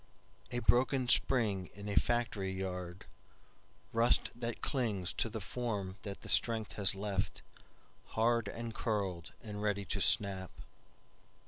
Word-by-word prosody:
A 120 - -3
broken 125 +1 +3
spring 110 -8 +2
in 100 +1 -8
a 100 - -2
factory 110 -5 +1
yard, 90 -1 -5 0.9
Rust 115 +1 +4
that 120 -1 -5
clings 105 -10 -1
to 115 - 0
the 110 - -4
form 105 -3 -3
that 100 -2 -6
the - - -9
strength 115 -2 +1
has 100 -2 +6
leftHard 105 +3 -3
and 115 -1 -6
curled 100 -7 -2
and 105 -2 -6
ready 100 -1 0
to - - -2
snap. 95 -3 +3
105 Hz, 125 wpm, -34 LUFS, 95-115 Hz, 0.9 s, has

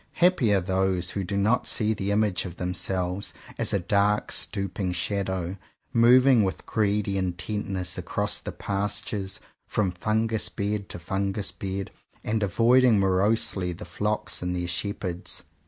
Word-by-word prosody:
Happy 175 - +3
are 100 - +4
those 95 -1 0
who 100 - -2
do 100 +2 -2
not 105 +5 +2
see 110 -1 +2
the 100 -1 -3
image 100 -3 +1
of 90 -3 -7
themselves 90 +1 -2 0.2
as - - +1
a - - +3
dark 100 +3 +1
stooping 95 -1 -1
shadow 95 0 -2 0.4
moving 125 0 +6
with 95 - -3
greedy 100 -2 0
intentness 95 +1 -2
across - - -1
the - - -6
pastures 100 0 -2 0.3
from 100 -4 0
fungus 110 +4 0
bed 100 -1 -3
to - - -6
fungus 95 +3 -2
bed, 95 0 -4 0.3
and 110 0 -1
avoiding 115 +4 +4
morosely 95 -1 +1
the 95 +5 -9
flocks 105 +1 -2
and 90 0 -2
their 90 0 -2
shepherds. 90 0 -3
100 Hz, 140 wpm, -26 LUFS, 95-105 Hz, 0.4 s, moving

